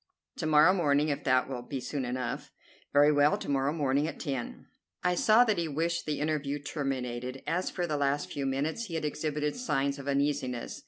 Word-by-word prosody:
"To - - -2
morrow 155 +4 +6
morning, 150 -4 +2
if 145 0 -2
that 130 -1 +3
will 130 -2 -4
be 135 +2 -5
soon 135 +1 -3
enough." 125 -1 -4 0.4
"Very 145 +1 +6
well; 145 0 +4
to - - -8
morrow 140 0 +1
morning 145 -1 +1
at - - -6
ten." 135 -6 -4 0.4
I 180 - +3
saw 215 +6 +5
that 215 -7 +1
he 170 - -1
wished 165 +3 -1
the 150 -1 -1
interview 150 -2 -1
terminated, 130 -3 -4
as, 180 +2 -1
for 180 - -2
the 155 -3 -1
last 140 +1 0
few 140 -1 -2
minutes, 150 - -1
he 170 - -6
had 160 - -2
exhibited 150 0 -2
signs 140 - -1
of 140 - -8
uneasiness. 140 -3 -1
145 Hz, 200 wpm, -30 LUFS, 135-155 Hz, 0.4 s, morrow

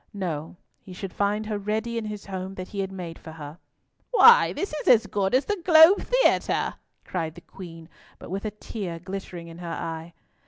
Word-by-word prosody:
No; 165 -5 -4 0.2
he 185 - -12
should 185 0 -7
find 205 +2 0
her 210 -1 -3
ready 220 +3 -2
in 230 -1 -2
his 210 -1 -6
home 190 0 -6
that 185 -1 -7
he 200 - -6
had 195 0 -2
made 175 -3 -7
for 160 - -10
her." 155 +1 -9 0.5
"Why, 475 0 +7
this 390 - -4
is 305 - -5
as 230 -2 +6
good 200 +1 0
as 265 - +2
the 415 -3 -2
Globe 330 +3 +8
Theatre!" - - +2 0.3
cried 165 -3 -3
the 175 - -12
Queen, 165 -3 -11 0.3
but - - -11
with 195 +1 -3
a - - 0
tear 205 -4 -6
glittering 180 -1 -7
in 165 +1 -11
her 175 - -7
eye. 165 0 -5
195 Hz, 200 wpm, -25 LUFS, 170-215 Hz, 0.5 s, Globe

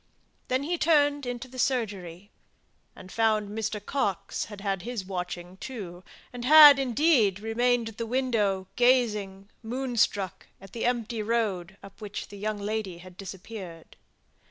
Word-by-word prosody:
Then 255 +2 0
he 340 +3 -2
turned 290 -3 +3
into 245 +1 -5
the 255 0 -10
surgery, 205 -7 -2 0.6
and 185 - -12
found 215 -2 +1
Mr. 215 0 -3
Coxe 200 -4 -2
had 205 -1 -10
had 195 -2 -2
his 235 -3 -5
watching 180 -1 -5
too, 190 -8 -8 0.3
and 245 -1 -6
had, 295 +1 +9
indeed, 250 - +3
remained 235 +2 +1
at 220 - -14
the 230 - -3
window 220 -7 0
gazing, 210 -6 +2
moonstruck, 235 -6 -1
at 195 -1 -14
the 230 - -3
empty 235 -2 -1
road, 205 -5 -1
up 195 +1 -14
which 210 -1 -6
the 205 - -10
young 215 +1 -2
lady 205 -3 -3
had 180 +1 -13
disappeared. 190 -3 -9
215 Hz, 145 wpm, -27 LUFS, 195-245 Hz, 0.6 s, had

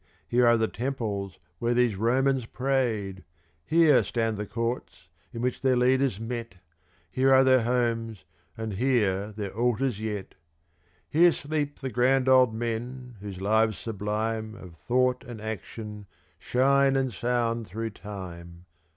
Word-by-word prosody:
Here 120 0 +3
are 120 0 +5
the 110 0 +1
temples 110 -7 -4 0.2
where 120 +1 0
these 120 -4 +3
Romans 130 +4 +1
prayed! 115 - -1 0.4
Here 160 - +5
stand 115 -2 -1
the 105 0 -5
courts 115 -5 -4 0.2
in 115 - -5
which 125 0 -1
their 130 -1 +3
leaders 130 -3 +2
met! 115 -3 -5 0.6
Here 130 +4 +2
are 130 0 +7
their 130 -1 +5
homes, 115 -3 -1 0.3
and 110 -2 -4
here 105 -3 +1
their 100 -2 -6
altars 120 0 0
yet! 105 -3 -4 0.7
Here 170 +3 +5
sleep 145 -1 -3
the 130 -1 -3
grand 130 +3 +2
old 130 -2 +6
men 120 +2 -5
whose 100 -2 -7
lives 110 +1 +2
sublime 110 +1 -3
Of 90 -5 -11
thought 125 - +1
and 120 -3 -9
action 105 0 -7 0.3
shine 135 +2 +3
and 130 -3 0
sound 115 +1 -1
through 115 +4 -4
time! 90 -4 -9
115 Hz, 140 wpm, -27 LUFS, 105-130 Hz, 0.7 s, are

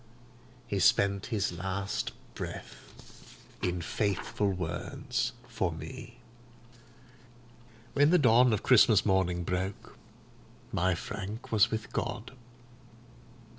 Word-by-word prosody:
He 100 -4 -2
spent 100 +1 +3
his 105 -6 0
last 95 +2 -3 0.2
breath - - -10 0.3
in 90 -1 -1
faithful 100 +1 -1
words 85 -2 -3 0.2
for 115 -7 -1
me. 120 +8 -9 1.8
When 145 +1 +5
the 180 - +6
dawn 125 -3 +5
of 110 -1 0
Christmas 110 -4 +6
morning 95 -3 +1
broke, 90 +3 -3 0.8
my 90 +1 +1
Frank 100 +5 -6
was 110 -1 +5
with 110 -1 -4
God. 115 +3 -3
100 Hz, 95 wpm, -30 LUFS, 90-115 Hz, 1.8 s, the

